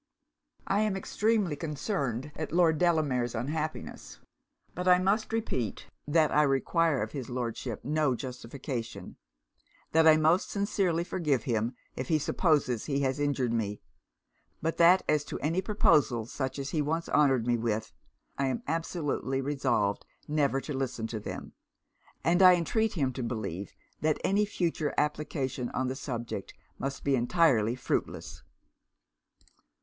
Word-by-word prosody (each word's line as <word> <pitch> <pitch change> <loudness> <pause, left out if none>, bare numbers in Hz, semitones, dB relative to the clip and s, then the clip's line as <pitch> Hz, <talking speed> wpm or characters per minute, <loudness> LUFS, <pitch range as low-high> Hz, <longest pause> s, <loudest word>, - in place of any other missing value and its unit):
'I 195 - +1
am 210 -2 +1
extremely 210 -4 0
concerned 145 - -3
at 155 - -4
Lord 165 -2 +3
Delamere's 145 -9 +1
unhappiness. 145 - -4 0.6
But 180 +1 -4
I 180 0 +7
must 200 +5 +1
repeat 215 - -3 0.2
that 155 +1 +3
I 150 - +4
require 145 +1 +2
of 110 - -5
his 135 -4 -6
Lordship 120 -2 -4
no 150 -3 +1
justification; 120 - -6 0.7
that 160 0 +5
I 155 -1 +8
most 160 +4 +3
sincerely 195 -4 0
forgive 150 -9 0
him 115 0 -1 0.2
if 130 - -4
he 155 - +3
supposes 145 - +1
he 140 -1 0
has 135 0 0
injured 140 -5 0
me; 105 -3 -1 0.8
but 165 +1 -2
that 175 +3 +6
as 150 -1 +2
to - - -5
any 165 +5 0
proposals 140 - +2
such 130 -1 -3
as 140 0 -4
he 155 - +1
once 160 +3 -1
honoured 135 -6 +3
me 120 0 +2
with, 110 -2 -2 0.5
I 135 - +2
am 130 - -2
absolutely 150 -4 -1
resolved 130 -7 0 0.2
never 145 -3 +1
to 150 - -5
listen 130 -4 -2
to 110 - -4
them; - - -7 0.7
and 175 +2 +3
I 185 -1 +9
entreat 220 +6 0
him 135 -7 0
to 130 - -5
believe 100 -6 -4 0.3
that 155 -1 +1
any 205 +2 +2
future 170 -6 -1
application 145 -4 -1
on 130 0 0
the 130 - -3
subject 120 -4 -5 0.2
must 135 0 -4
be 140 -1 +2
entirely 125 -4 +3
fruitless.' 130 - -3
145 Hz, 145 wpm, -29 LUFS, 125-165 Hz, 0.8 s, I